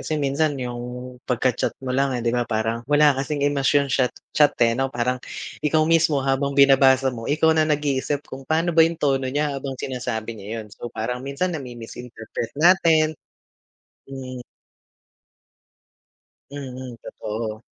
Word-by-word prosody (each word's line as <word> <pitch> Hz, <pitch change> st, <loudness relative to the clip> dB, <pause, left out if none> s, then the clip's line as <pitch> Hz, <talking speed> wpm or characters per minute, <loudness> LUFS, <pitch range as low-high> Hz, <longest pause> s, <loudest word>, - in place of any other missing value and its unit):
kasi 155 Hz, -, -2 dB
minsan 145 Hz, +1 st, 0 dB
yung 125 Hz, 0 st, -6 dB
pagkachat 125 Hz, 0 st, 0 dB
mo 130 Hz, -, -2 dB
lang, 135 Hz, -1 st, +1 dB
eh, 120 Hz, -, -4 dB
'di 115 Hz, -, +1 dB
ba, 120 Hz, -1 st, 0 dB
parang 110 Hz, +1 st, -1 dB
wala 150 Hz, 0 st, +5 dB
kasing 145 Hz, +1 st, -2 dB
emosyon 140 Hz, -1 st, +2 dB
chat-chat, 140 Hz, +3 st, +1 dB
eh, 115 Hz, -, +3 dB, 0.2 s
parang 125 Hz, 0 st, -1 dB, 0.4 s
ikaw 155 Hz, +1 st, +2 dB
mismo 160 Hz, -4 st, +3 dB
habang 140 Hz, +1 st, 0 dB
binabasa 135 Hz, -1 st, +5 dB
mo 115 Hz, -1 st, -6 dB
ikaw 160 Hz, +2 st, +3 dB
na 155 Hz, -1 st, +2 dB
nag-iisip 145 Hz, -1 st, 0 dB
kung 135 Hz, 0 st, -10 dB
pano 165 Hz, +2 st, +1 dB
ba 165 Hz, -, +5 dB
yung 165 Hz, -, -3 dB
tono 135 Hz, -4 st, 0 dB
niya 145 Hz, +2 st, 0 dB
habang 135 Hz, -1 st, -5 dB
sinasabi 120 Hz, -4 st, -4 dB
niya 110 Hz, +3 st, -5 dB
yun, -, -, -13 dB
so, 120 Hz, -, -7 dB
parang 125 Hz, +3 st, -3 dB
minsan 140 Hz, +7 st, -2 dB
namimis-interpret 120 Hz, -4 st, -7 dB
natin. 160 Hz, -2 st, +4 dB, 0.9 s
Mm. 130 Hz, -2 st, -7 dB, 2.1 s
Mm, 130 Hz, -3 st, -7 dB
totoo. 110 Hz, +1 st, -5 dB
135 Hz, 140 wpm, -23 LUFS, 125-145 Hz, 2.1 s, wala